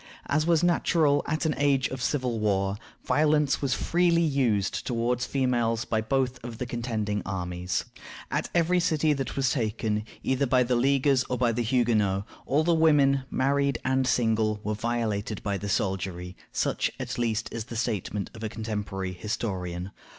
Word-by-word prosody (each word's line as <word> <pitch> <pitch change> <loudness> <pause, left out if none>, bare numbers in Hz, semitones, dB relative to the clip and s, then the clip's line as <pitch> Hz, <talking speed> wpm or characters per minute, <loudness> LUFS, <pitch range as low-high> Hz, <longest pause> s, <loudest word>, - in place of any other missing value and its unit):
As 155 +2 +1
was 170 -1 +3
natural 160 -4 +3
at 155 +1 -1
an 155 - +2
age 140 -2 +3
of 130 -1 -6
civil 125 -3 -1
war, 100 -2 +1 0.3
violence 150 -1 +2
was 135 -1 +1
freely 170 -1 +2
used 125 - +1
toward 120 0 0
females 120 -4 0
by 110 -1 0
both 130 +2 -1
of 120 -2 -7
the 125 - -3
contending 110 -4 -2
armies. 90 -2 -3 0.5
At - - -1
every 175 +1 +3
city 155 -3 +2
that 135 -3 -3
was 130 -3 +1
taken, 110 -3 -1 0.2
either 130 +1 +1
by 125 +1 +4
the 125 0 +1
Leaguers 135 +1 +3
or 125 -1 +1
the 120 - -1
Huguenots, 110 -5 +1 0.2
all 145 +4 +2
the 170 +1 +3
women, 145 -4 +4
married 140 0 +1
and 130 0 +2
single, 110 -4 +1
were 105 - -1
violated 110 -2 -2
by 100 -2 -1
the 100 - -4
soldiery; 95 -2 -2 0.2
such, - - 0
at - - -4
least, 115 -3 0
is 115 -2 -4
the 115 - -8
statement 105 -3 -2
of 110 - -9
a 110 - -2
contemporary 105 -4 -4
historian. 90 -2 -4
120 Hz, 165 wpm, -27 LUFS, 105-140 Hz, 0.5 s, by